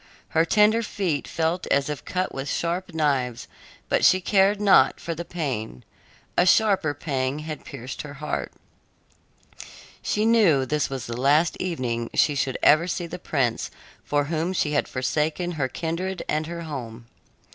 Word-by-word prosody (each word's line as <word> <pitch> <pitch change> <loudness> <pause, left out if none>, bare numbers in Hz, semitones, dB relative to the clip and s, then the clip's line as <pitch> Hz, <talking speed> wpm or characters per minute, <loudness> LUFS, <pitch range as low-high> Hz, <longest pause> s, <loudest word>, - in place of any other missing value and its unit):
Her 160 +1 +3
tender 215 +4 +4
feet 185 -9 -2
felt 165 +2 -1
as 140 0 +2
if 150 -2 -5
cut 185 0 -2
with 135 +1 -4
sharp 175 +2 -2
knives, 130 -6 0 0.4
but - - +1
she 185 - +6
cared 195 +2 +3
not 205 -2 +5
for 170 - -4
the 170 +1 -5
pain; 130 - -4 0.5
a - - +5
sharper 190 -5 +3
pang 135 -2 -2
had 155 -1 -6
pierced 125 +3 -7
her 145 -1 -9
heart. 150 +2 -4 1.5
She 210 +1 0
knew 200 - +4
this 150 +2 0
was 135 -3 -5
the 115 - -5
last 150 +5 +3
evening 120 -10 -2
she 150 - +4
should 135 -2 -1
ever 160 +4 +5
see 175 0 -2
the 180 +2 -7
prince 130 -9 -1 0.3
for 145 0 +1
whom 165 +4 -2
she 150 -4 0
had 145 - +1
forsaken 150 +6 -1
her 145 -6 -1
kindred 170 +7 -3
and 155 +1 -1
her 170 0 -5
home. 120 -7 -7
155 Hz, 160 wpm, -24 LUFS, 135-180 Hz, 1.5 s, she